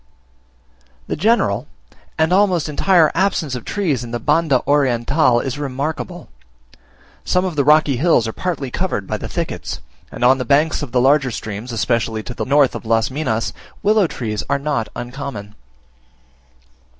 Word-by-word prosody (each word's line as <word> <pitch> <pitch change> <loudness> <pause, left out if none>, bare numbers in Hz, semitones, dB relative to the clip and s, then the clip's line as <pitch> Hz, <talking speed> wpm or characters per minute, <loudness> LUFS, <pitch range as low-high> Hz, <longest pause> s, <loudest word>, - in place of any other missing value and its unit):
The - - -3
general, 150 - +1 0.5
and 160 +3 +2
almost 185 -5 +3
entire 160 +1 +3
absence 170 -6 0
of 125 -2 -5
trees 155 - -1
in 120 - -7
Banda 130 +4 +1
Oriental 135 -1 +2
is 135 +3 -4
remarkable. 150 +5 -4 1.0
Some 180 +1 +1
of 180 -4 -3
the 140 - +2
rocky 150 -2 +4
hills 140 -5 +3
are 110 - -4
partly 155 -8 -3
covered 175 - -2
by - - -3
thickets, - - -4 0.3
and - - -5
on 130 +2 +5
the - - -1
banks 145 +7 +2
of 145 -5 -6
the 125 - +2
larger 135 0 +3
streams, 110 +1 -6
especially 115 -1 -1
to 120 - -7
the - - -4
north 140 0 +3
of - - -6
Las 115 +1 +1
Minas, 125 -6 -2 0.3
willow 210 -2 +4
trees 110 -8 -4
are 140 - +2
not 140 -7 -2
uncommon. 120 -5 -6
140 Hz, 150 wpm, -19 LUFS, 120-160 Hz, 1.0 s, on